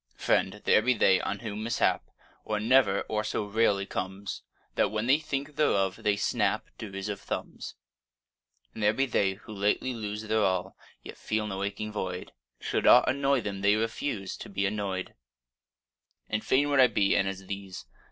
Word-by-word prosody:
FRIEND, 105 +2 0
there - - +5
be 125 +3 +2
they 95 -3 +4
on 100 - -3
whom 105 -2 -5
mishap 115 +2 0 0.3
Or 105 -1 -2
never 110 -3 +4
or 105 0 -2
so 105 - -2
rarely 100 -1 +1
comes, 95 +1 -5 0.3
That, - - +2
when 110 +1 -2
they 135 +4 +4
think 145 -1 -4
thereof, 95 -10 +2
they 105 - +2
snap 100 - 0
Derisive 100 -1 -5
thumbs: - - -6 1.0
And - - -7
there 105 +1 +4
be 135 +4 +1
they 100 -6 +1
who 110 +2 -12
lightly 105 +5 0
lose 105 -2 -5
Their 110 0 +1
all, 95 -1 0 0.3
yet - - -10
feel 110 0 -1
no 95 -2 -4
aching 105 +2 -3
void; 90 -3 -4 0.3
Should - - -1
aught - - +7
annoy 140 -1 +2
them, 100 -2 -5
they 100 +1 +4
refuse 110 -2 -2
To - - -9
be 100 0 -1
annoy'd: 100 -2 -3 1.1
And 105 0 -2
fain 145 +2 +2
would 140 - +3
I 130 - +8
be 105 -3 +2
e'en 95 - +2
as 95 0 -5
these! 100 -1 -7
105 Hz, 175 wpm, -28 LUFS, 100-115 Hz, 1.1 s, I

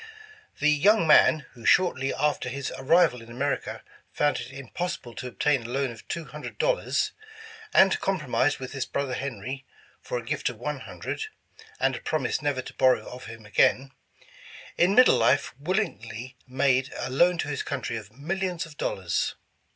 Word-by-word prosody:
The 150 +1 +4
young 185 +6 +4
man, 155 -1 +6
— - - -28
who 120 - -14
shortly 135 -7 +3
after 150 -4 0
his 135 +1 -4
arrival 135 -3 +3
in 115 - -13
America, 135 +5 -2 0.3
found 145 0 +1
it - - -7
impossible 135 0 -5
to 120 +4 -6
obtain 135 +2 +1
a 115 - -8
loan 135 0 -1
of 115 - -13
two 170 -2 -4
hundred 150 0 -8
dollars, - - +1 0.6
and 190 0 +5
compromised 145 -6 +1
with 130 -1 -7
his 135 -2 -3
brother 140 -2 -2
Henry, 130 0 -4 0.4
for - - -3
a - - -6
gift - - -1
of - - -8
one - - -3
hundred, 440 - -5 0.5
and - - +2
a - - -7
prom 155 -4 -1
ise - - -1
never 145 -3 -1
to - - -9
borrow 130 -1 +3
of 125 +1 -9
him 115 -1 -10
again, 130 +5 +3 0.4
— - - -21 0.3
in 185 +3 +3
middle 255 - +7
life 130 +5 +2
will 180 +7 -1
ingly 125 - -3
made 130 0 +2
a 130 - -4
loan 175 +6 +4
to 155 - -2
his 140 - -2
country 130 -4 -3
of 105 -2 -7
millions 175 - -3
of 155 -3 -14
dollars. 90 -3 -1
140 Hz, 180 wpm, -26 LUFS, 125-160 Hz, 0.6 s, middle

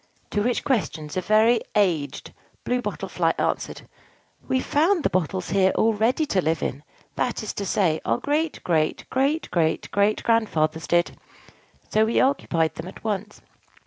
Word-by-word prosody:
To 205 - 0
which 240 +3 0
questions 155 - -1
a 185 - 0
very 220 +4 +4
aged 175 -9 0 0.3
Blue 250 0 0
Bottle - - -4
Fly - - 0
answered, - - -2 0.6
"We 260 - +1
found 325 +6 +2
the - - +1
bottles 185 0 -1
here 190 -1 +4
all 225 0 +3
ready 230 +9 +1
to 195 -10 +1
live 160 -1 0
in; 135 - -3 0.4
that 245 -3 -1
is 215 - -4
to 200 - -4
say, 170 -6 +1
our - - +1
great 300 +5 -1
great 155 -3 0
great 280 +5 0
great 160 -2 0
great 205 +1 +2
grandfathers 160 -9 +1
did: 175 0 +1 0.7
so 215 +1 +3
we 225 - +1
occupied 170 - +1
them - - -7
at 185 - -11
once. 210 -1 -3
205 Hz, 165 wpm, -24 LUFS, 170-245 Hz, 0.7 s, very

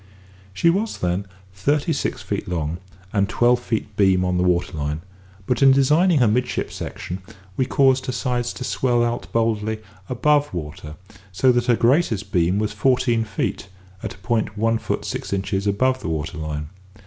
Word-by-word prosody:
She 170 - +3
was, 210 +5 -1
then, 90 +3 -1 0.3
thirty 145 - +1
six 140 - -2
feet - - -3
long, 85 -1 -2 0.3
and 100 -1 +2
twelve 120 0 +3
feet 110 -3 -3
beam 95 -2 +3
on 90 0 0
the 90 - +2
water 90 -1 +1
line; 75 +1 -3 0.4
but, 125 - 0
in 135 -1 +8
designing 150 +6 +4
her 125 -4 +4
midship 125 +4 0
section, 90 +2 -6 0.4
we 130 - 0
caused 135 -1 +3
her - - 0
sides 125 -2 -1
to - - -6
swell 120 -2 +1
out 120 0 -2
boldly 110 -1 0 0.3
above 145 -1 +2
water, 75 -1 -6 0.4
so 125 +7 +4
that 120 0 +1
her 120 - +5
greatest 115 - +2
beam 90 +2 +2
was 105 0 -1
fourteen 120 0 +2
feet, 105 -2 -3 0.3
at - - -5
a 95 - -22
point 110 -3 0
one 115 +1 +1
foot - - -3
six - - -4
inches 95 +1 -1
above 130 +6 +2
the 95 - -4
water 80 0 -3
line. 75 -1 -4
110 Hz, 175 wpm, -22 LUFS, 95-130 Hz, 0.4 s, in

